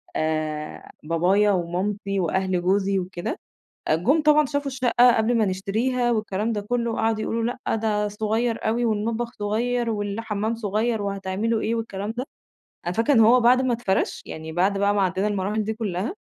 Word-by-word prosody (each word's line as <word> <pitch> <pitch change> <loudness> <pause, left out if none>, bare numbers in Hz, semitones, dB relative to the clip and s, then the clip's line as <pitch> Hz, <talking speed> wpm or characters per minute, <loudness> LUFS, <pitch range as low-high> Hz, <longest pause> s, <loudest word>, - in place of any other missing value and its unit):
آآ 155 -1 -3
بابايا 185 +6 +2
ومامتي 195 +3 -1
وأهل 185 +1 0
جوزي 195 +1 +1
وكده، 185 - -5 0.5
جُم 250 - +3
طبعًا 300 -1 +5
شافوا 285 +1 -2
الشقة 250 -2 +4
قبل 225 +2 +2
ما 220 - +3
نشتريها 225 +6 0
والكلام 215 0 -1
ده 210 - -2
كله 235 +2 -2
قعدوا 220 -1 0
يقولوا: 230 +1 -1 0.2
"لأ، - - +1
ده 210 -1 0
صغير 220 +2 -1
أوي 235 +2 +1
والمطبخ 230 +2 -1
صغير، 230 +3 0
والحمام 210 +1 -2
صغير، 220 +1 -1
وهتعملوا 200 +3 -1
إيه؟" 230 - -1
والكلام 215 -2 -4
ده. 255 +3 -3 0.6
أنا 175 - -1
فاكرة 230 +7 +2
إن 230 - +5
هو 230 +3 +6
بعد 250 +2 +5
ما 255 -2 +1
اتفرش 200 -5 -1
يعني، 160 0 -7
بعد 190 +4 +1
بقى 200 +1 +2
ما 205 - +1
عدينا 190 +2 0
المراحل 205 +1 -1
دي 220 +1 -2
كلها 215 - -3
210 Hz, 165 wpm, -24 LUFS, 195-230 Hz, 0.6 s, هو